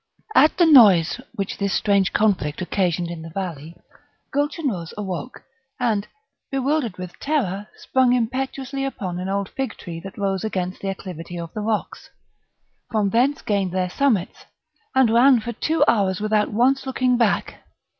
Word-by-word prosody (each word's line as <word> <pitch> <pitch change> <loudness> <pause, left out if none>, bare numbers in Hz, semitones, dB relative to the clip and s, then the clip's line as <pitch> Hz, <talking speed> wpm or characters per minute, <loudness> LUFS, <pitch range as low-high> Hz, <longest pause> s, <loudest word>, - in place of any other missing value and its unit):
At 305 - +5
the 350 - +5
noise 220 - +6
which 195 -1 -4
this 200 -1 0
strange 200 -3 +2
conflict 190 -9 +1
occasioned 175 -2 -1
in 170 -2 -7
the 165 - -8
valley, 165 -3 -6 0.6
Gulchenrouz 280 - -2
awoke, 200 +4 -5 0.4
and, 220 -5 0 0.4
bewildered 270 -5 -1
with 180 -1 -8
terror, 210 -10 -1
sprung 260 -2 +2
impetuously 265 +3 -2
upon 190 -10 -4
an 185 +1 -4
old 200 0 -1
figtree 220 -10 -5
that 195 +3 -10
rose 195 -2 -1
against 185 -4 -3
the 195 - -2
acclivity 175 -3 -7
of 170 -1 -7
the 215 - -4
rocks; 215 0 -3 0.8
from 210 -3 0
thence 260 +6 +2
gained 195 -4 0
their 185 -1 -1
summits, 225 -9 0 0.5
and 260 -4 +4
ran 250 +1 +6
for 235 +2 -5
two 320 +8 +1
hours 195 -4 +2
without 215 0 +1
once 260 +5 +2
looking 255 -1 +1
back. 230 -4 0
210 Hz, 150 wpm, -22 LUFS, 185-255 Hz, 0.8 s, noise